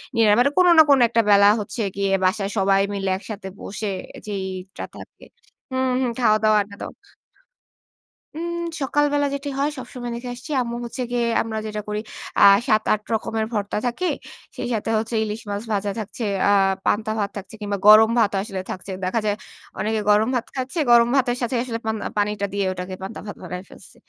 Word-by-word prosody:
ইয়ে, 230 - +4 0.2
মানে 280 +3 +4
কোন 365 -1 +6
না - - +11
কোন 275 -2 +6
একটা 230 0 +2
বেলা 200 0 +7
হচ্ছে 210 +3 -4
গিয়ে 200 -1 0
বাসায় 195 +1 +1
সবাই 195 0 +3
মিলে 195 -1 -2
একসাথে 205 -1 -8
বসে 210 +1 -4 0.4
যেইটা 190 -1 -5
থাকে - - -13 0.5
হুম, 260 0 0
হুম, 250 - +1
খাও-দাও, 215 -2 +4
আড্ডা 200 0 -8
দাও। - - -6 1.4
উম 340 +1 -3 0.3
সকালবেলা 290 +1 +1
যেটি 280 +1 -5
হয়, 290 +2 +2
সবসময় 245 -1 -6
দেখে 245 +1 -6
আসছি 250 +5 -9
আম্মু 235 -1 -3
হচ্ছে 235 +2 -6
গিয়ে, 240 -1 +1 0.2
আমরা 220 -1 -4
যেটা 210 0 -4
করি, 210 0 -2 0.4
আ - - +6 0.2
৭, 215 -2 +3
৮ 215 - -1
রকমের 220 0 -1
ভর্তা 205 -1 -2
থাকে। 245 +10 -1 0.5
সেই 245 - -3
সাথে 220 0 -2
হচ্ছে 225 +2 -2
ইলিশ 215 +1 -4
মাছ 200 +2 -3
ভাজা 200 0 -1
থাকছে, 215 +3 -6 0.3
আ - - +5 0.3
পান্তা 215 +1 +1
ভাত 200 - 0
থাকছে, 200 +2 -9
কিংবা 205 -1 -2
গরম 220 +1 +9
ভাতও 205 -3 +2
আসলে 195 -3 -5
থাকছে। 190 +1 -7
দেখা 205 +5 0
যায় 205 -1 +1 0.4
অনেকে 220 +1 0
গরম 210 +3 +4
ভাত 240 -1 -1
খাচ্ছে। 260 +6 -3
গরম 235 0 +6
ভাতের 250 -2 +2
সাথে 240 +1 -1
আসলে, 230 -3 -4
পান 220 0 0 0.2
পানিটা 205 0 0
দিয়ে 200 -1 0
ঐটাকে 185 0 -5
পান্তা 195 +4 -6
ভাত 205 - -7
বানায় 180 +1 -6
ফেলছি। - - -15
215 Hz, 185 wpm, -22 LUFS, 200-240 Hz, 1.4 s, না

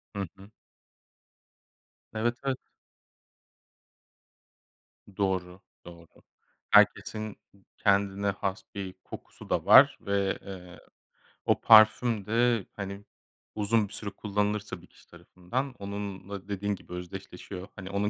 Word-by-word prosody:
Hı - - -3 0.2
hı. 100 +2 -14 1.6
Evet, 120 +2 0
evet. 135 -1 0 2.6
Doğru, 95 -1 -1 0.2
doğru. 85 -1 -12 0.6
Herkesin 110 -1 +3 0.4
kendine 100 0 +2
has 100 0 -3
bir 95 -2 -5
kokusu - - -11
da - - 0
var - - +8
ve, 100 -1 0
eee, 90 -3 -10 0.7
o - - +2
parfüm 110 -1 +6
de, 115 0 +2
hani, 100 0 -6 0.5
uzun 105 0 +2
bir - - -14
süre 105 - -5
kullanılırsa 105 +1 -2
bir - - -17
kişi - - -23
tarafından, 125 +9 -5
onunla 100 -1 -6
dediğin 100 0 -2
gibi 90 - -13
özdeşleşiyor. 90 +1 -8
Hani, 95 -1 -8
onun 100 +1 0
100 Hz, 105 wpm, -28 LUFS, 95-105 Hz, 2.6 s, var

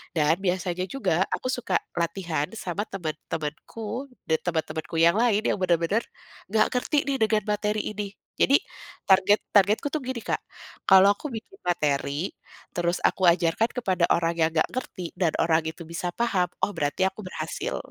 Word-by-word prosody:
dan 155 +1 +3
biasanya 185 -1 -1
juga 190 -10 +1
aku - - -2
suka 250 -2 0 0.2
latihan 170 -3 -1
sama 195 -2 -3
teman-temanku 185 - -5 0.2
dan 160 - +4
teman-temanku 160 -2 -2
yang 170 +3 +6
lain 225 -3 +3
yang - - +2
bener-bener, 180 +4 +2 0.5
nggak 220 - +4
ngerti 250 +4 0
nih 275 - +1
dengan 215 -1 +3
materi 210 0 0
ini. 205 -1 -4 0.3
Jadi 275 - +6 0.5
target 190 +2 +5 0.2
targetku 205 +7 +4
tuh 310 - -1
gini 250 -2 -4
Kak, - - -1 0.5
kalau 190 +1 +8
aku 300 - -6
bikin 230 - -8
materi, 150 -1 0 0.5
terus 175 0 +1
aku 190 - +2
ajarkan 170 +6 +2
kepada 190 -8 0
orang 170 0 +1
yang 160 0 +4
nggak 160 - +3
ngerti 240 -7 -5
dan 175 -3 +2
orang 165 -1 +3
itu 160 +2 -5
bisa 170 +1 -3
paham 200 -7 +1 0.2
oh - - +3
berarti 145 +5 0
aku 190 - -11
berhasil, 160 -3 -4
185 Hz, 160 wpm, -26 LUFS, 165-215 Hz, 0.5 s, kalau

